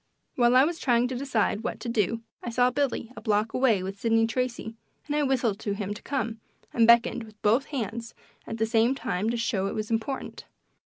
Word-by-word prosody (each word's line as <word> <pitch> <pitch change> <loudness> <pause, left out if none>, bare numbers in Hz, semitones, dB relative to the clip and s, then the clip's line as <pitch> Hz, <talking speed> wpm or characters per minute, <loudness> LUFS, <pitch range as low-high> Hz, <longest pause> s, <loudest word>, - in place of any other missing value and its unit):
While 240 0 +4
I 260 - +7
was 330 +3 -1
trying 245 -2 +2
to 255 - -3
decide 245 -5 0
what - - -3
to - - -5
do 230 0 0 0.2
I - - -5
saw 245 +1 +3
Billy 255 -3 -1
a - - -8
block 215 0 0
away 230 -8 +2
with 195 +1 -6
Sidney 225 0 +3
Tracy, 230 -1 -2 0.3
and 295 - -2
I 300 - +2
whistled 250 -7 +1
to 205 -2 -2
him 200 0 -3
to 210 - -10
come, 230 -5 -3 0.3
and 230 -1 +4
beckoned 235 +1 +5
with 215 -1 -15
both 230 +6 +3
hands 235 -3 -5 0.3
at 225 - -4
the 225 - +1
same 225 +3 +2
time 225 -5 -2
to 235 - -1
show 200 -4 0
it - - -4
was 215 +1 -3
important. 230 +4 -3
230 Hz, 215 wpm, -27 LUFS, 220-250 Hz, 0.3 s, I